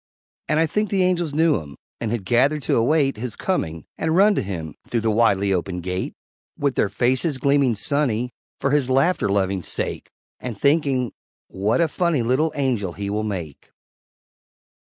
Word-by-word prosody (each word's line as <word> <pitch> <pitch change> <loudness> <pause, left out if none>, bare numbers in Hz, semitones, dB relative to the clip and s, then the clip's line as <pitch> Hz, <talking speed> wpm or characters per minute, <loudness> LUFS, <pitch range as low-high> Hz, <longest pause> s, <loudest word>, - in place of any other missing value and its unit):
And 155 0 +2
I 165 - +4
think 210 +6 -1
the 190 -1 +2
Angels 175 -5 0
knew 160 -5 +3
him, 70 -3 -11 0.2
And 115 - -2
had 110 -4 -3
gathered 135 +7 +2
to - - +1
await 135 +2 +2
His 115 -1 -4
coming, 80 - -2
and 160 0 0
run 205 +3 +6
to - - 0
him 85 -6 -5
Through 115 - -1
the 110 0 +1
widely 100 -3 +3
opened 90 -1 -2
Gate 90 +1 -3 0.4
With 140 -2 0
their 105 - +1
faces 130 - +1
gleaming 140 -3 +2
sunny 125 -1 0 0.3
For 140 - 0
his 140 -3 +2
laughter 135 - +2
loving 95 -1 +1
sake, - - -2 0.3
And 120 -5 -5
thinking, 140 -5 +2 0.4
"What 105 - 0
a 165 - +4
funny 165 -5 0
Little 130 +7 +1
Angel 120 - -1
he 100 +1 -4
will 105 +1 -1
make!" 90 -9 -5
125 Hz, 170 wpm, -22 LUFS, 100-150 Hz, 0.4 s, run